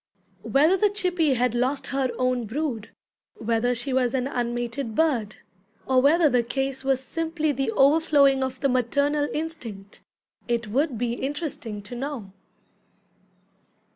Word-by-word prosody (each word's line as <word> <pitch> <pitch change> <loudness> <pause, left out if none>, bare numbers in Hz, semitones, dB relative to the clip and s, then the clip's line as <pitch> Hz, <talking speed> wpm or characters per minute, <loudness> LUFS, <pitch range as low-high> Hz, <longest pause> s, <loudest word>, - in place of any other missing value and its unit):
Whether 310 +7 +3
the 415 +2 +3
chippy 360 -8 +1
had 245 -1 +1
lost 255 +3 0
her 270 -1 +1
own 255 -2 0
brood, 240 -3 -3 0.5
whether 230 +2 0
she 255 +3 -4
was 255 -1 +1
an 255 -1 0
unmated 240 -1 -3
bird, 245 -10 +1 0.5
or 260 -1 +3
whether 310 +4 +5
the 250 -3 +3
case 270 +3 -3
was 270 -1 +2
simply 320 +2 -2
the 270 -2 -1
overflowing 280 -1 +4
of 260 -1 -4
the 275 - +2
maternal 285 +4 +1
instinct, 235 -11 -6 0.5
it 235 -1 0
would 265 +4 0
be 235 +1 -1
interesting 265 -6 -4
to 205 - -10
know. 245 -5 -5
265 Hz, 140 wpm, -25 LUFS, 240-290 Hz, 0.5 s, whether